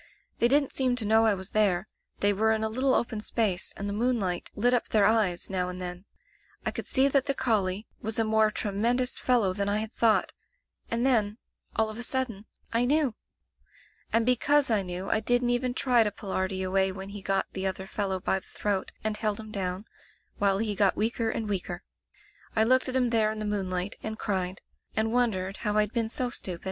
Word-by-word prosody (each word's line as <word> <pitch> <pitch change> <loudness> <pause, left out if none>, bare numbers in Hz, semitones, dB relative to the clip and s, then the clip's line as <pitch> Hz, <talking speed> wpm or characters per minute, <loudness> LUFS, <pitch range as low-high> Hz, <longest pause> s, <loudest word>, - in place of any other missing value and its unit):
They 235 - +5
didn't 280 +2 +3
seem 255 -2 +1
to 235 -3 -4
know 220 +1 +4
I 210 - +3
was 190 +1 -7
there. 200 -3 +2 0.3
They 205 0 +4
were 220 +2 +2
in 220 0 -1
a 220 - 0
little 255 +4 +1
open 225 -2 -1
space, 210 -5 0
and 200 - -4
the 200 - -2
moonlight 210 -6 0
lit 245 +4 +2
up 245 - +1
their 210 -2 +4
eyes 205 -5 +2
now 180 -2 -1
and 180 0 -6
then. 180 +1 -4 0.6
I - - 0
could - - -6
see 265 +1 +4
that 275 0 +2
the 275 - 0
collie 210 -6 0 0.2
was 220 0 -2
a 225 - +3
more 220 0 +3
tremendous 235 +5 0
fellow 230 -7 +2
than 200 +1 -1
I 205 - +1
had 220 +2 -4
thought— 225 -2 +2 0.6
and 235 +2 0
then 220 -5 +2 0.2
— - - -37
all 220 - +2
of 215 - -8
a - - -3
sud 260 +1 0
den 210 -1 -10 0.2
— - - -18
I 230 +1 +3
knew! 285 -2 +2 1.0
"And 230 0 +2
because 270 +2 +3
I 215 -2 +3
knew 180 +1 -5
I - - +2
didn't 245 +2 +1
even 245 0 0
try 245 -4 +4
to 210 - -1
pull 200 -1 -8
Artie 190 0 -1
away 190 +1 +2
when 190 +1 -7
he 200 0 -8
got 195 0 +1
the 190 0 -1
other 190 0 -3
fellow 195 -1 -2
by 190 +1 0
the - - -23
throat, 200 -2 -2
and 215 0 0
held 215 -1 -1
him 215 -1 -9
down, 190 0 -3 0.5
while 195 -1 +3
he 215 0 -1
got 200 -1 +2
weaker 225 +1 0
and 220 -1 -2
weaker. 180 -3 -3 0.7
I 220 - +4
looked 255 +3 +3
at 255 - -2
him 250 -2 +2
there 220 -2 +3
in 215 - -6
the 215 - -3
moonlight, 190 -2 -2
and 220 0 -4
cried, 190 -3 -2 0.3
and 220 +1 +1
won 245 -1 +3
dered 185 +1 -4
how 210 -1 -1
rd 210 0 +2
been 230 -2 0
so 245 +1 -2
stupid. 180 -7 -5
215 Hz, 225 wpm, -28 LUFS, 195-235 Hz, 1.0 s, They